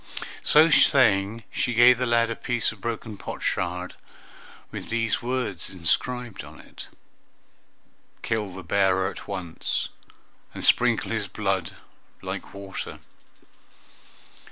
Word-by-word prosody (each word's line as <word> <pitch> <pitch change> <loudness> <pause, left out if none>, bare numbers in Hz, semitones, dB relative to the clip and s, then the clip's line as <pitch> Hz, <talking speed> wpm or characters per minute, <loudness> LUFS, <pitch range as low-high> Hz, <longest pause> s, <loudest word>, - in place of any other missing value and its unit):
So 155 +2 +6
saying, 115 -6 +4
she 120 -2 -1
gave 120 +1 +7
the 125 - 0
lad 115 0 +3
a - - -2
piece 120 -1 0
of 110 -3 -14
broken 115 -2 -4
potsherd, 90 0 -3 0.8
with - - -7
these 115 -1 0
words 120 -8 -2
inscribed 115 +6 -1
on - - -13
it, - - -11 1.4
"Kill 105 -4 -1
the 95 0 -9
bearer 95 +1 +2
at - - -11
once, 90 -5 -3 0.7
and - - -5
sprinkle 120 -2 +3
his 110 -3 -1
blood 95 -2 -2 0.5
like - - -5
water!" 100 -1 -6
110 Hz, 115 wpm, -25 LUFS, 95-120 Hz, 1.4 s, gave